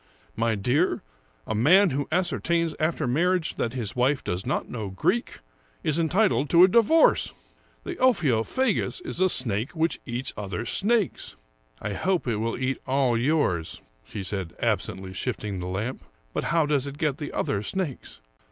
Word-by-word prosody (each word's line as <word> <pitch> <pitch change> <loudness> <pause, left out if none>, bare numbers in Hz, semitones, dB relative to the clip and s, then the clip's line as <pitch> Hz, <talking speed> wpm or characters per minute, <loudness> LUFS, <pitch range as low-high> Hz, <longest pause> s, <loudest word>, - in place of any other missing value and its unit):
jMy 115 -1 0
dear, 140 - +1 0.4
a - - -2
man 170 - +5
who 140 +1 -2
ascertains 170 -1 +1
after 155 -1 0
marriage 170 +6 +1
that 115 - -1
his 115 -6 -2
wife 130 +3 +1
does 90 +5 -3
not 135 - -1
know 110 -5 -5
Greek, 190 - -1 0.4
is 155 +1 +1
entitled 160 - +2
to 170 +1 +7
a - - +9
divorce. 235 - +4 0.5
The 360 -2 -5
Ophio 160 - +3
phagus 260 - 0
is 335 - -3
a 185 - +5
snake 120 - +1
which 165 +1 0
eats 120 +2 -3
other 105 +2 -4
snakes." 210 - 0 0.2
" - - -36
I 100 - -3
hope 180 - 0
it 115 -3 0
will 115 +2 -2
eat 130 +1 -1
all 130 -2 +2
yours," 115 - 0 0.2
she 100 - -7
said, 95 -3 -4
absently 95 0 -2
shifting 105 -2 -3
the 90 - -4
lamp. 100 +8 -3 0.3
"But - - -2
how 165 -1 +2
does 145 -2 +1
it 140 0 -7
get 150 -1 -1
the 145 - -5
other 100 - -1
snakes? 145 - -4
135 Hz, 170 wpm, -26 LUFS, 110-170 Hz, 0.5 s, a